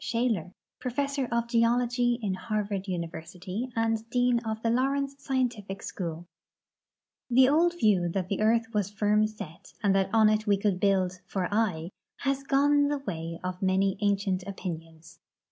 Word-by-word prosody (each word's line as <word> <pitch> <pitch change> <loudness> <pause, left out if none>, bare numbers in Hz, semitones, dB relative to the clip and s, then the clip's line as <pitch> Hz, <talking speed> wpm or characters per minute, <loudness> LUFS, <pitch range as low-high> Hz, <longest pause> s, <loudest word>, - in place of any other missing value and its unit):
Shaler, 225 -7 -1 0.2
Professor 275 +1 -1
of 235 0 0
Geology 240 +1 +2
in 195 -3 0
Harvard 205 -1 -3
University 180 +6 -5
and 225 -1 +1
Dean 245 0 +2
of 220 -2 -4
the 230 - +2
Lawrence 275 +3 +1
Scientific 245 -8 -2
School 170 -2 -5 1.0
The 255 +1 +6
old 340 +5 +3
view 195 - +3
that 185 +1 -2
the 200 +2 -2
earth 225 +1 +2
was 205 -2 0
firm 210 +1 +2
set 205 -7 -10
and 200 -2 +4
that 195 -1 +2
on 220 -1 +5
it 215 0 +1
we 200 -1 +4
could 195 -2 0
build 185 -2 +1
" - - -44
for 185 -2 0
aye 185 -6 0
" - - -63
has 275 0 +1
gone 285 +1 +3
the 290 0 0
way 165 -10 -5
of 180 0 -4
many 190 0 +2
ancient 200 -2 +1
opinions. 165 -4 -7
210 Hz, 160 wpm, -28 LUFS, 185-245 Hz, 1.0 s, The